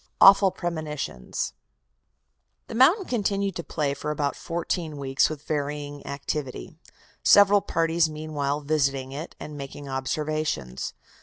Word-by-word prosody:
AWFUL 195 0 +8
PREMONITIONS 155 - -4 1.1
The - - -7
mountain 310 - +5
continued 200 - 0
to 170 - -4
play 145 -4 -1
for 140 +2 -5
about 145 -2 -1
fourteen 170 -2 -3
weeks 135 -1 +2
with 150 -2 -6
varying 145 -1 -3
activity, 140 - -4 0.4
several 205 0 +7
parties 165 -1 +1
meanwhile 150 -2 -2
visiting 140 -3 0
it 150 +4 -7
and 150 - -7
making 140 0 -7
observations. 135 - -2
150 Hz, 120 wpm, -26 LUFS, 140-170 Hz, 1.1 s, AWFUL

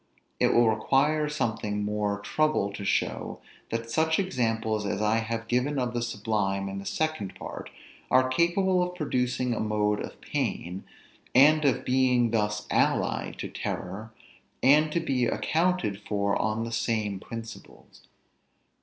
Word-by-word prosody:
It - - +3
will 120 -1 +5
require 140 +7 +2
something 110 -7 -2
more 105 -1 -1
trouble 105 -4 0
to 100 - -6
show, 95 - -1 0.3
that 115 0 -3
such 160 +5 +2
examples 115 - 0
as 100 0 -2
I 110 +1 +2
have 115 0 -3
given 125 +5 0
of 125 -3 -1
the 120 - -1
sublime 100 -3 -1
in 95 0 -5
the 100 - -7
second 155 -6 -2
part - - -7 0.4
are 130 0 +4
capable 180 +6 +2
of 180 0 -2
producing 125 -5 0
a - - -3
mode 105 -1 +1
of - - -7
pain, 90 +3 -3 0.5
and 155 +4 +6
of 135 - +2
being 125 -2 +3
thus 105 -2 0
allied - - +1
to - - -4
terror, 105 +5 -5 0.5
and 150 +4 +5
to 170 - +1
be 135 -6 0
accounted 160 - 0
for 100 -1 0
on 110 +1 0
the 115 - -5
same 110 -4 -1
principles. 115 - -10
115 Hz, 145 wpm, -27 LUFS, 105-140 Hz, 0.5 s, and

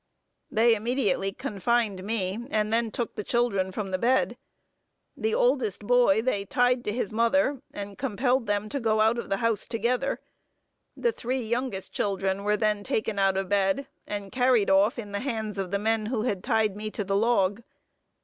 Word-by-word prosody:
They 230 +2 +4
immediately 215 -4 0
confined 215 -3 -1
me, 210 +2 -2
and 215 -3 0
then 230 0 +1
took 235 +1 -3
the 210 - -5
children 200 -5 +1
from 195 0 -4
the 185 - -1
bed. 255 +4 +2 0.8
The 440 +1 -1
oldest 260 - +1
boy 230 -3 +4
they 205 -6 0
tied 245 +4 +2
to 210 - 0
his 215 -2 -3
mother, 255 +4 +2
and 200 -1 -7
compelled 250 0 0
them 205 0 0
to 280 - -2
go 220 -3 +1
out 220 +2 +3
of - - -6
the 195 - +1
house 230 -1 0
together. 245 +4 -1 0.8
The 475 - +1
three 255 - -3
youngest 235 -3 -3
children 195 -1 -1
were 210 +1 +2
then 210 -2 0
taken 215 0 -1
out 195 -1 +3
of 190 -1 -2
bed, 200 +6 +1 0.2
and 200 -2 -5
carried 245 -6 +3
off 200 +6 +4
in 210 -4 -6
the 200 - -2
hands 220 -5 -3
of 190 -2 -2
the 200 - 0
men 220 +1 0
who 225 -2 -1
had 205 -7 -2
tied 215 -3 +1
me 215 +1 -4
to 210 - -3
the 195 0 -1
log. 205 -1 +2
215 Hz, 185 wpm, -27 LUFS, 200-240 Hz, 0.8 s, They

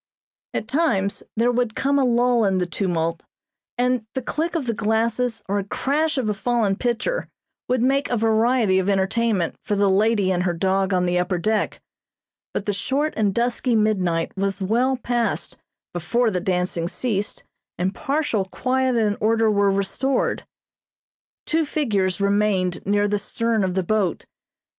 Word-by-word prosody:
At - - -2
times 230 -10 +1 0.2
there 235 +2 +3
would 240 -2 -1
come 280 +1 +1
a - - +3
lull 245 -1 +3
in 195 -2 +2
the 180 - +1
tumult, 165 -2 -1 0.6
and 250 -1 +1
the 260 - -2
click 330 +7 -2
of 315 -5 -1
the 230 - -1
glasses 225 +2 0
or 200 +1 0
crash 290 +10 -1
of 255 -4 0
a 210 - +1
fallen 220 -1 0
pitcher 245 - -2 0.4
would 250 -1 +1
make 275 +2 +1
a 245 - 0
variety 225 -2 +3
of 190 +1 0
entertainment 195 -1 0
for 210 - -1
the 200 -1 +3
lady 205 -1 +2
and 180 -1 +1
her 180 -1 0
dog 190 +2 +1
on 180 -1 +2
the 180 0 +1
upper 180 +1 0
deck; 215 +4 -1 0.7
but 200 - -3
the 205 - 0
short 280 +9 -1
and 205 -3 +1
dusky 240 +1 0
midnight 185 -6 +1
was 195 0 -1
well 240 +7 +1
passed 240 -1 -1 0.4
before 220 +8 +1
the 185 - -1
dancing 180 -2 -1
ceased 205 0 -3 0.3
and 185 +2 -1
partial 285 -9 -1
quiet 255 +5 0
and 215 -3 +1
order 225 0 +3
were 200 -1 +3
restored. 200 +8 0 1.0
Two 325 0 +1
figures 205 -12 0
remained 200 -3 +1
near 205 0 +2
the 205 0 0
stern 225 +1 0
of 185 -1 -1
the 190 - +1
boat. 195 -2 0
215 Hz, 160 wpm, -22 LUFS, 190-245 Hz, 1.0 s, there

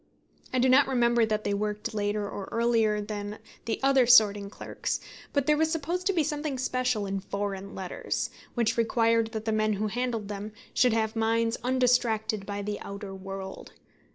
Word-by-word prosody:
I 255 - 0
do 255 +1 +4
not 265 +2 +6
remember 235 -3 +3
that 215 -1 -1
they 205 - 0
worked 210 +1 -2
later 205 0 -1
or 200 -1 -6
earlier 230 -2 +2
than 205 0 -5 0.3
the 225 -1 -2
other 270 -2 +4
sorting 205 -4 +6
clerks; - - -4 0.3
but 280 -2 +1
there 300 - +4
was 320 +1 +2
supposed 345 +3 -2
to 390 - +2
be 330 -4 +2
something 295 -2 -2
special 250 -4 0
in 195 0 -2
foreign 200 0 -4
letters, 190 -2 -3 0.2
which 230 -1 +1
required 230 0 +3
that 220 0 -4
the 220 - 0
men 215 0 +2
who 210 +1 -1
handled 235 -2 -2
them 210 +1 -6 0.2
should 250 -3 +4
have 220 0 0
minds 225 +1 +1
undistracted 235 -5 +1
by 205 0 -3
the 205 0 -3
outer 200 0 -7
world. 195 0 -7
220 Hz, 180 wpm, -28 LUFS, 205-250 Hz, 0.3 s, not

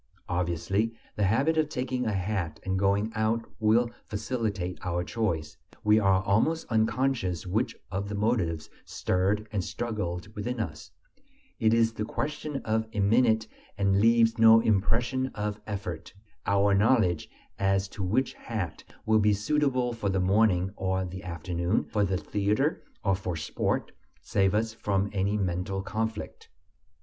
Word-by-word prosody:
Obviously, 90 +6 0 0.2
the 105 - +1
habit 140 +11 +2
of 155 -1 +1
taking 125 -2 -2
a - - +1
hat 95 -4 -2
and 95 0 -1
going 100 +3 +2
out 110 +1 0
will 115 +2 +3 0.2
facilitate 105 -5 -3
our 90 -1 -1
choice; 90 -6 -2 0.3
we 105 +1 +5
are 95 -2 +3
almost 130 +13 +2
unconscious 110 -5 +1
which 110 +6 -1 0.2
of 100 +2 -3
the 105 - -3
motives 100 -7 0 0.2
stirred 100 +4 0
and 100 -4 -1
struggled 105 -3 -4
within 115 +3 -3
us. 85 -3 -5 0.7
It 110 -3 +3
is 115 0 +3
the 105 - -3
question 150 +4 -3
of 110 0 0
a 105 - -2
minute 110 +2 +3 0.3
and 100 0 +3
leaves 115 0 +4
no 115 0 +8
impression 115 +5 +1
of 105 0 -3
effort. 95 -5 -5 0.3
Our 100 0 +3
knowledge 100 -5 +3 0.3
as 95 0 +2
to 100 - -5
which 115 +8 +1
hat 95 -9 -5 0.2
will 110 0 +4
be 105 0 +4
suitable 125 +3 +1
for 115 -3 -2
the 95 -1 +1
morning 95 -1 +3
or 95 0 -1
the 95 +1 -7
afternoon, 85 +2 -1
for 105 -2 0
the 95 -1 +1
theater 105 - 0 0.2
or 100 -3 +3
for 95 -2 -3
sport, 80 - -2 0.3
saves 95 0 +1
us 110 +1 0
from 100 -2 -1
any 100 +2 +1
mental 95 0 -2
conflict. 110 +1 -4
105 Hz, 150 wpm, -28 LUFS, 95-115 Hz, 0.7 s, no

